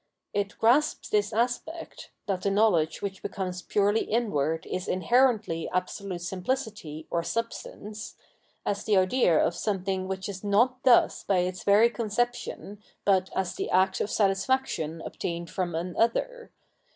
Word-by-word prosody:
It 205 0 -2
grasps 270 +7 +2
this 210 0 +1
aspect 245 +9 -3
— - - -52
that 195 -3 -1
the 200 - +1
knowledge 195 -7 +2
which 195 -1 -4
becomes 185 -2 -4
purely 205 +3 +2
inward 165 -9 0
is 185 0 -4
inherently 215 -3 +2
absolute 185 0 -3
simphcity, 185 - -3
or 170 - +1
Substance 215 +1 -5 0.3
— - - -40
as 200 0 -1
the 210 -2 +3
idea 185 -2 +3
of 170 - +2
something 190 0 -2
which 190 0 -4
is 195 -1 -7
not 240 +5 +2
thus 250 -3 +4
by 195 - +1
its 180 0 -3
very 210 +4 +5
conception, 235 -2 -3 0.2
but 190 -2 +3
as 190 -2 -1
the - - -4
act 190 +1 +2
of - - -1
satis 195 -2 +2
faction 165 -12 -1
obtained 170 -1 -4
from 175 -3 -2
an 175 +2 -3
other. 485 - 0
200 Hz, 150 wpm, -27 LUFS, 180-230 Hz, 0.3 s, very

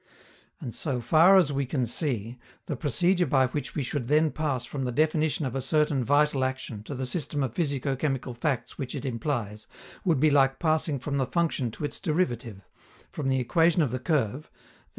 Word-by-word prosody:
And, 120 - -6
so 135 -5 -2
far 165 - +6
as 160 -6 +3
we 140 -1 -1
can 130 -2 0
see, 120 -2 -2 0.3
the 150 - -3
procedure 175 +6 +1
by 135 -3 +3
which 140 +3 -4
we 145 - -1
should 125 -1 -3
then 155 +2 +3
pass 140 -6 -2
from 135 +2 -4
the 125 - -1
definition 155 +2 +1
of 130 - -3
a 135 - -2
certain 145 0 +1
vital 145 +1 +2
action 130 -5 -3
to 140 - -5
the 130 0 -3
system 145 0 -2
of 125 -4 -3
physico 140 -3 -1
chemical 135 -2 -2
facts 130 +1 -3
which 135 -1 -4
it 140 -1 -5
implies 115 -4 -3 0.4
would 165 -8 +2
be 155 +2 +4
like 135 -1 +3
passing 155 -2 +1
from 140 +2 -3
the 130 -2 0
function 160 -7 0
to 115 - -5
its - - -4
derivative, 120 - -1 0.5
from 145 - -4
the 130 0 +2
equation 165 +6 +3
of 135 - -1
the 130 - -2
curve 135 -1 -1
(_i. - - -35
140 Hz, 200 wpm, -27 LUFS, 125-155 Hz, 0.5 s, far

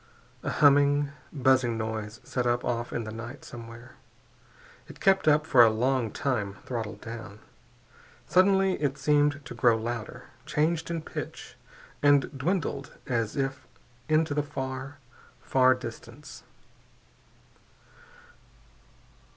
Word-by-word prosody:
A - - -3
humming, 145 0 +4 0.2
buzzing 130 -4 +2
noise 110 0 -4
set 125 -1 -2
up 120 0 0
off 120 -1 -2
in 115 - -2
the 110 - -6
night 120 +5 -8
somewhere. 120 +1 -11 0.9
It - - -13
kept 195 -3 +3
up 150 0 +4
for 130 -6 +6
a 115 - +6
long 120 +1 0
time, 105 -6 -2
throttled 115 -4 -5
down. 110 -3 -8 0.9
Suddenly 190 -1 +3
it 140 -2 0
seemed 145 0 +2
to - - -7
grow 120 -3 +3
louder, 120 +2 -5 0.2
changed 160 +2 0
in 165 -2 -3
pitch, - - -7 0.5
and 145 -1 +3
dwindled 145 -2 -2
as 115 -4 -1
if 135 -1 -3 0.4
into 155 -1 +2
the 150 - +1
far, 135 0 -5 0.4
far 130 -1 +4
distance. 120 +3 -10
130 Hz, 120 wpm, -28 LUFS, 115-145 Hz, 0.9 s, for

